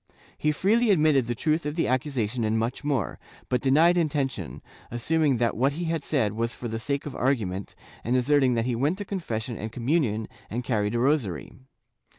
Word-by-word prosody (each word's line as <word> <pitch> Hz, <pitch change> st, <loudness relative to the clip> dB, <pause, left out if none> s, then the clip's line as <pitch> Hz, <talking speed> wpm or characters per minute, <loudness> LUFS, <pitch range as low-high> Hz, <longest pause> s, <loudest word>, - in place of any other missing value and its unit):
He 150 Hz, -, +1 dB
freely 220 Hz, +9 st, +2 dB
admitted 150 Hz, -, +4 dB
the 120 Hz, -, -1 dB
truth 155 Hz, +7 st, 0 dB
of 150 Hz, 0 st, -3 dB
the 165 Hz, -, +1 dB
accusation 125 Hz, -3 st, -1 dB
and 110 Hz, +1 st, +1 dB
much 115 Hz, +5 st, -2 dB
more, 140 Hz, -, -1 dB, 0.3 s
but 125 Hz, -2 st, +1 dB
denied 160 Hz, +6 st, +4 dB
intention, 140 Hz, -, -1 dB, 0.3 s
assuming 140 Hz, +3 st, +1 dB
that 115 Hz, -1 st, +1 dB
what 135 Hz, +5 st, +2 dB
he 170 Hz, +4 st, -4 dB
had 165 Hz, -2 st, -1 dB
said 115 Hz, -10 st, +1 dB
was 115 Hz, +2 st, -2 dB
for 120 Hz, -, -5 dB
the 115 Hz, 0 st, -3 dB
sake 140 Hz, +5 st, -2 dB
of 145 Hz, -, -6 dB
argument, 105 Hz, -8 st, -1 dB, 0.3 s
and 120 Hz, +3 st, 0 dB
asserting 130 Hz, -1 st, +3 dB
that 115 Hz, 0 st, 0 dB
he 125 Hz, -1 st, 0 dB
went 145 Hz, +9 st, +1 dB
to 205 Hz, -, -5 dB
confession 120 Hz, -, -4 dB
and 110 Hz, +2 st, -5 dB
communion 115 Hz, -3 st, 0 dB, 0.2 s
and 120 Hz, +3 st, -3 dB
carried 110 Hz, -3 st, 0 dB
a -, -, +1 dB
rosary. 130 Hz, -, 0 dB
130 Hz, 190 wpm, -26 LUFS, 115-150 Hz, 0.3 s, admitted